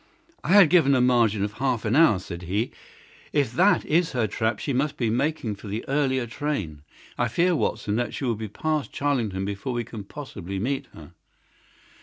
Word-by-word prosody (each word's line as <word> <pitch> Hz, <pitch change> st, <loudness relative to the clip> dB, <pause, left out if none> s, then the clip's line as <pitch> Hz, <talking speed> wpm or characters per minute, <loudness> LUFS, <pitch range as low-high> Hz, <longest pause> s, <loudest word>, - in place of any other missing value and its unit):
"I 175 Hz, -, +1 dB
had 195 Hz, -7 st, +7 dB
given 140 Hz, -6 st, +5 dB
a -, -, +3 dB
margin 120 Hz, -5 st, +3 dB
of 105 Hz, 0 st, -2 dB
half 130 Hz, -4 st, 0 dB
an 110 Hz, +3 st, +1 dB
hour," 155 Hz, -10 st, +6 dB
said 90 Hz, -2 st, -7 dB
he. 100 Hz, +7 st, -2 dB, 0.6 s
"If 140 Hz, -6 st, +1 dB
that 190 Hz, +4 st, +3 dB
is 165 Hz, +2 st, +1 dB
her 120 Hz, -3 st, +1 dB
trap 110 Hz, +2 st, -1 dB
she 140 Hz, -, -3 dB
must 140 Hz, +3 st, 0 dB
be 115 Hz, -3 st, 0 dB
making 125 Hz, -4 st, -1 dB
for 105 Hz, -, -11 dB
the 105 Hz, +3 st, -4 dB
earlier 135 Hz, -3 st, +1 dB
train. 110 Hz, -, -4 dB, 0.4 s
I 120 Hz, -, +2 dB
fear, 175 Hz, +9 st, +2 dB
Watson, 105 Hz, -7 st, -1 dB
that 120 Hz, 0 st, -1 dB
she 135 Hz, -, -3 dB
will 120 Hz, -, +1 dB
be 110 Hz, 0 st, -5 dB
past 155 Hz, +7 st, -2 dB
Charlington 115 Hz, -10 st, -1 dB
before 100 Hz, +6 st, -4 dB
we 120 Hz, 0 st, -1 dB
can 110 Hz, -3 st, -8 dB
possibly 100 Hz, -, -7 dB
meet 135 Hz, +6 st, -2 dB
her." 80 Hz, +1 st, -12 dB
120 Hz, 195 wpm, -25 LUFS, 105-145 Hz, 0.6 s, had